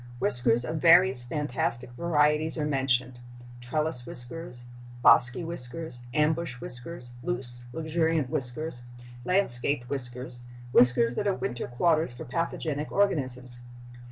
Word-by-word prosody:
Whiskers 120 -1 +3
of 160 - -3
various 170 -5 +5
fantastic 125 -3 -3
varieties 150 +2 +1
are 150 - -1
mentioned—trellis 125 0 -2
whiskers, 125 0 -5 0.4
bosky 125 +8 +6
whiskers, 160 -3 -6
ambush 150 -1 0
whiskers, 125 +1 -8
loose, 120 0 -5
luxuriant 160 0 0
whiskers, 135 -1 -4 0.4
landscaped 140 -8 +2
whiskers, 125 -2 -6 0.3
whiskers 120 -1 +5
that 205 - -2
are 195 - +2
winter 120 -1 -4
quarters 155 +2 +1
for 120 - -8
pathogenic 155 0 -3
organisms. 130 -11 -1
130 Hz, 105 wpm, -27 LUFS, 120-160 Hz, 0.4 s, bosky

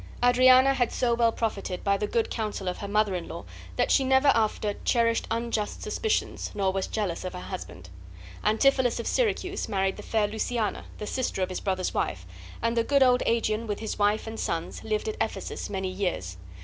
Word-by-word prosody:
Adriana 255 +2 +6
had 245 -3 +1
so 240 -2 +1
well 235 -1 +3
profited 200 -5 -3
by 200 0 +3
the 210 +1 -1
good 230 +1 0
counsel 215 -4 -3
of 180 - -2
her 200 - -5
mother 210 -1 +2
in 180 - -4
law - - -7 0.3
that - - +1
she 275 - +5
never 265 +2 +4
after 215 -3 +2
cherished 230 -1 +2
unjust 230 -2 -2
suspicions 440 -2 -1
nor 195 -2 +1
was 195 -1 -1
jealous 200 -6 -2
of 185 - -4
her 180 - -6
husband. 180 - -8 0.6
Antipholus 245 +3 +3
of 235 - -4
Syracuse 395 - 0
married 195 -2 0
the - - -7
fair 215 -2 +1
Luciana, 220 +1 -2
the 210 - -5
sister 240 -4 -1
of - - -2
his 185 - -3
brother's 185 -2 -1
wife; 90 0 -2 0.4
and 230 0 +1
the 230 - +3
good 280 +2 +4
old 250 -1 +4
Aegeon, 230 -1 +1
with 205 - -2
his 220 -1 -4
wife 205 +1 +2
and 225 0 -6
sons, 165 -1 -3
lived 215 - -1
at 435 - -3
Ephesus - - -3
many 190 -1 -2
years. 180 - -3
220 Hz, 200 wpm, -27 LUFS, 195-245 Hz, 0.6 s, Adriana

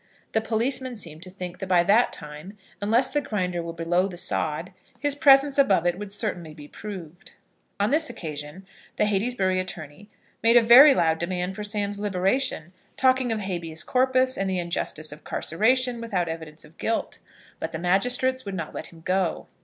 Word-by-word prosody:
The 220 - +1
policeman 250 +3 -1
seemed 165 -7 -4
to 185 - -9
think 180 -1 -8
that 190 - -5
by 180 -2 +4
that 210 +7 +4
time, 150 +7 -8 0.2
unless 230 +6 +2
the 295 - +1
Grinder 180 -8 -2
were 165 0 -5
below 170 +3 0
the 180 -3 -8
sod, 165 +2 -1 0.3
his 290 -1 +1
presence 280 -1 +5
above 195 -11 +4
it 175 +1 0
would 205 -1 -7
certainly 180 -7 -3
be 145 -2 -11
proved. 185 -2 -10 0.5
On 205 +4 +1
this 310 +1 +2
occasion 155 -3 -7 0.3
the - - +2
Heytesbury 195 -2 0
attorney 180 +1 -7 0.3
made 230 +1 +6
a 240 - +6
very 265 +5 +9
loud 160 -2 +2
demand 180 +1 -2
for 210 - -5
Sam's 205 -1 -2
liberation, 195 - -1 0.2
talking 260 -2 +3
of 220 -1 -1
habeas 170 -4 -4
corpus, 260 0 +2
and 195 0 0
the 190 - -1
injustice 170 -3 -3
of 150 - -12
carceration 240 +7 +1
without 195 -7 -1
evidence 160 -1 -7
of 155 +2 -20
guilt. 225 - -2 0.4
But - - -4
the - - -4
magistrates 250 +9 +1
would 200 -2 -5
not 165 -4 -5
let - - -6
him 165 -1 -16
go. 185 0 -1
195 Hz, 180 wpm, -25 LUFS, 170-235 Hz, 0.5 s, very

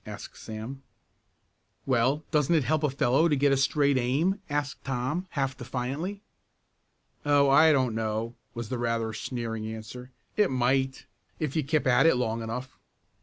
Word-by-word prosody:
asked - - -8
Sam. 110 +5 -7 1.0
"Well, 130 +4 +2
doesn't 150 +1 +3
it 155 - +3
help 155 +4 +1
a 150 - +2
fellow 135 +4 +3
to 150 - +2
get 140 0 +3
a - - +4
straight 140 0 +2
aim?" 155 +11 +1
asked 145 -2 -2
Tom, 135 +8 -2
half 135 -3 -1
defiantly. 135 - -4 1.0
"Oh, 145 -1 +4
I 155 +3 +7
don't 130 -5 +2
know," 110 +1 -2 0.2
was 120 -2 -5
the 125 - -3
rather 115 -2 -1
sneering 115 -1 -4
answer. 110 +3 -8 0.3
"It 210 -2 +3
might, 130 +1 0 0.3
if 150 -2 -3
you 155 - +1
kept 150 +2 0
at 130 +5 +5
it 165 - +5
long 115 -2 -1
enough." 125 +4 -6
130 Hz, 160 wpm, -28 LUFS, 120-145 Hz, 1.0 s, I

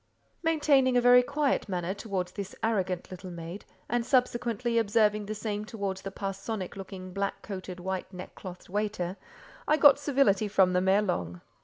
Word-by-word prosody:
Maintaining 285 -6 +3
a - - +4
very 245 +1 +7
quiet 280 -2 0
manner 180 0 -2
towards 195 -3 -3
this 200 0 -6
arrogant 190 -6 -1
little 185 0 -8
maid, 170 +2 -8 0.2
and 240 0 0
subsequently 240 -2 +1
observing 210 -1 +2
the 215 - -3
same 210 -1 -3
towards 200 -3 -4
the 195 - -5
parsonic 195 0 -5
looking, 185 -1 -8
black 200 0 -3
coated, 185 -3 -6
white 190 +1 -4
neckclothed 180 0 -9
waiter, 200 -2 -2 0.5
I 305 - +4
got 285 -2 +7
civility 265 -8 +2
from 190 -2 +3
them 180 +1 +1
ere 200 +2 +4
long. 90 - -3
200 Hz, 160 wpm, -29 LUFS, 185-235 Hz, 0.5 s, very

